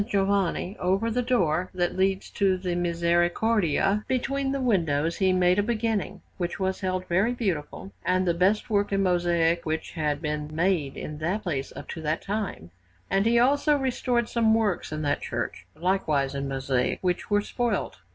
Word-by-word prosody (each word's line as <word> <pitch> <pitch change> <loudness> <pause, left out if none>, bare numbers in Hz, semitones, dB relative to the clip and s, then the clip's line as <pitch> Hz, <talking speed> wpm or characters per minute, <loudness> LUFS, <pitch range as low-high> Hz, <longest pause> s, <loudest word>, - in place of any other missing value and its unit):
Giovanni, 195 -2 0
over 195 +6 +1
the 250 +2 +1
door 185 -9 +1
that 175 -1 0
leads 190 0 0
to 195 -2 +2
the 180 -1 -3
Misericordia, 175 +3 +1
between 270 +1 -1
the 275 - -1
windows, 165 - +1
he 190 -1 +3
made 180 +1 +3
a - - +5
beginning, 225 -1 -1 0.2
which 175 0 -3
was 190 0 -1
held 185 -1 -1
very 195 +8 +2
beautiful 155 - -3
and 185 0 +1
the 170 - +3
best 190 +5 +2
work 205 -2 +1
in 195 0 +2
mosaic 175 -2 +2
which 160 0 -3
had 150 -3 -1
been 150 -1 -3
made 165 -5 0
in 150 0 -6
that 185 +7 -1
place 145 -8 -3
up - - -8
to 165 - -5
that 155 +1 -1
time; 200 - -4 0.4
and 195 +3 +2
he 235 +1 +4
also 285 +4 +3
restored 250 -3 0
some 225 -2 +3
works 210 -8 0
in 155 0 -3
that 145 - 0
church, - - -4
likewise 155 -6 0
in 140 0 -3
mosaic, 135 -2 0
which 180 -1 -1
were 205 -1 +3
spoilt. 240 +3 -2
185 Hz, 175 wpm, -26 LUFS, 165-215 Hz, 0.4 s, a